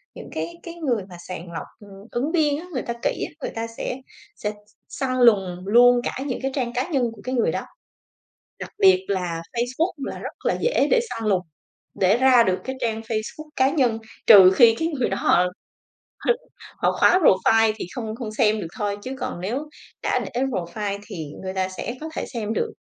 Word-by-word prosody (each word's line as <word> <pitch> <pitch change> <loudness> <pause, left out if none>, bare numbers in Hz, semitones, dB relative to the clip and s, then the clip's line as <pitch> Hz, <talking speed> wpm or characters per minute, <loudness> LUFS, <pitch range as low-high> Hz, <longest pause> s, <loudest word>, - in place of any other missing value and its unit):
những - - -9
cái 340 - -3
cái 340 -1 -8
người 255 - -1
mà 175 - -10
sàng 180 -1 -6
lọc, 165 - -5
ừm, 200 +1 -14
ứng 275 +6 -1
viên 300 -4 +2
á, 350 - -9
người 255 - -1
ta 235 - -4
kỹ - - 0
á, - - -20
người - - -3
ta 230 0 -3
sẽ - - -3 0.4
sẽ 210 - -3
s - - -11 0.4
săn 255 -2 -2
lùng 195 -7 +4
luôn 245 +2 +6
cả - - -3
những 255 - -2
cái 270 0 -1
trang 245 -4 -1
cá 260 +6 -1
nhân 275 -7 +1
của - - -14
cái 255 +1 -2
người 235 - +2
đó. - - -2 1.0
Đặc - - -7
biệt 190 0 +5
là 180 -4 -2
Facebook 255 +9 0
là 275 - -5
rất - - -6
là - - +3
dễ - - +2
để - - +5
săn 225 - -4
lùng, 190 -3 +3 0.6
để 190 +3 +5
ra 255 -2 +6
được 185 -2 +1
cái 260 0 -4
trang 225 -1 -1
Facebook 225 +7 -5
cá 265 +1 +4
nhân 245 -8 +2 0.3
trừ 190 -4 +9
khi 230 -1 +7
cái 325 - 0
người 280 -7 -1
đó - - -2
họ 180 - +4 0.8
hứ - - +6 0.5
họ - - +2
khóa 365 - +6
profile 225 - +4
thì - - -5
không 220 -3 -4
không 230 -3 -5
xem 215 0 +2
được 170 - -4
thôi 205 -1 -1
chứ 260 - -5
còn 175 - -4
nếu 255 +11 -3 0.3
đã - - +1
để 245 +1 -3
profile 200 -4 -2
thì 180 -7 -6 0.2
người 190 0 -4
ta 190 0 0
sẽ 190 +5 -5
có 315 - -5
thể - - -2
xem 220 -2 -2
được. 450 -1 -1
230 Hz, 215 wpm, -23 LUFS, 200-265 Hz, 1.0 s, trừ